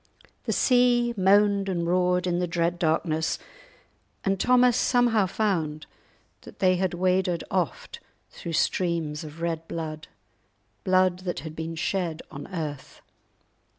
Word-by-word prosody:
The - - -1
sea 245 -1 +3
moaned 200 0 +3
and 170 -2 -1
roared 180 +1 +2
in 175 -1 0
the 180 - 0
dread 170 +1 -1
darkness, 160 -1 0 0.9
and 195 -1 +1
Thomas 250 0 +4
somehow 240 -5 +3
found 170 -7 -1 0.6
that - - -14
they 185 -2 +3 0.2
waded 180 -1 0
oft 180 -6 -2 0.3
through 170 - -7
streams 165 -3 0
of 155 +1 -10
red 165 -1 -2
blood—blood 175 +3 -3
that 185 -1 -4
had 155 -1 -8
been 165 +1 -5
shed 165 -1 -2
on 145 -1 -8
earth. 155 -7 -6
180 Hz, 120 wpm, -26 LUFS, 165-195 Hz, 0.9 s, Thomas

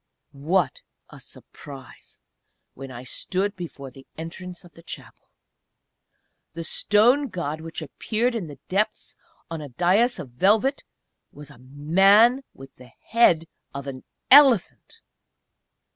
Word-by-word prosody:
What 150 +1 -1 0.3
a - - -13
surprise 135 -3 -13 0.6
when 135 0 -10
I 125 -1 -9
stood 190 - -3
before 150 -7 -8
the 135 +1 -16
entrance 175 +2 -8
of 175 - -17
the 165 - -16
Chapel! 165 - -11 1.3
The 165 - -5
stone 240 - +2
God 160 - -5
which 165 0 -7
appeared 225 - -2
in 215 -8 -4
the 145 -2 -11
depths 200 +3 -2 0.4
on 165 -2 -5
a 145 - -8
dais 190 - +2
of 130 - -9
velvet 215 - +2 0.5
was 145 -1 -13
a - - -17
Man 195 - +4
with 135 0 -14
the 125 0 -15 0.2
head 180 -8 +4 0.3
of 140 0 -6
an 130 -2 -8 0.3
Elephant! 275 - +5
170 Hz, 130 wpm, -24 LUFS, 140-210 Hz, 1.3 s, Elephant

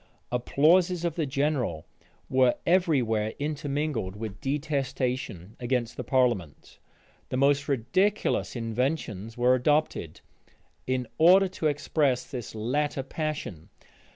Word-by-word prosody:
Applauses 170 +8 +3
of 170 - 0
the 160 -2 -2
general 135 - -1 0.4
were 130 -1 +3
every 170 -6 +3
where 110 -1 -1
intermingled 145 -8 -2
with 105 -1 -7
detestation 130 - -2
against 120 -1 -1
the - - -5
parliament 120 - -1 0.5
The 130 - -2
most 140 +1 +3
ridiculous 155 - 0
inventions 115 -2 -2
were 125 +1 +4
adopted, 140 - 0 0.7
in 130 -1 0
order 185 +4 +7
to 175 -4 -1
express 145 -2 +1
this 125 -5 -7
latter 135 +5 -1
passion. 145 - -5
135 Hz, 110 wpm, -27 LUFS, 120-150 Hz, 0.7 s, order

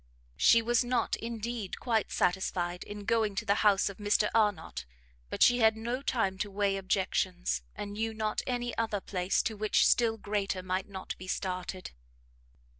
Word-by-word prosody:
She 230 - +5
was 240 +2 +2
not, 245 -1 0
indeed, 230 -3 -5
quite 225 -4 0
satisfied 180 -1 0
in 205 0 -8
going 220 -3 +1
to 210 - -2
the 200 0 +2
house 205 -2 +4
of 200 - -5
Mr 210 0 +2
Arnott, 210 -7 +1 0.5
but - - +2
she 245 0 +5
had 220 -1 +4
no 240 +4 -3
time 210 -9 0
to 210 - -2
weigh 200 0 0
objections, 125 - -1
and 205 0 -6
knew 225 +2 -2
not 215 -1 -2
any 245 -2 -2
other 220 -3 0
place 185 -1 0
to 220 - -2
which 210 0 +2
still 230 -2 +3
greater 200 -3 -2
might 185 +2 -2
not 190 -1 -6
be 185 - -9
started. 185 -1 -4
205 Hz, 170 wpm, -30 LUFS, 190-225 Hz, 0.5 s, She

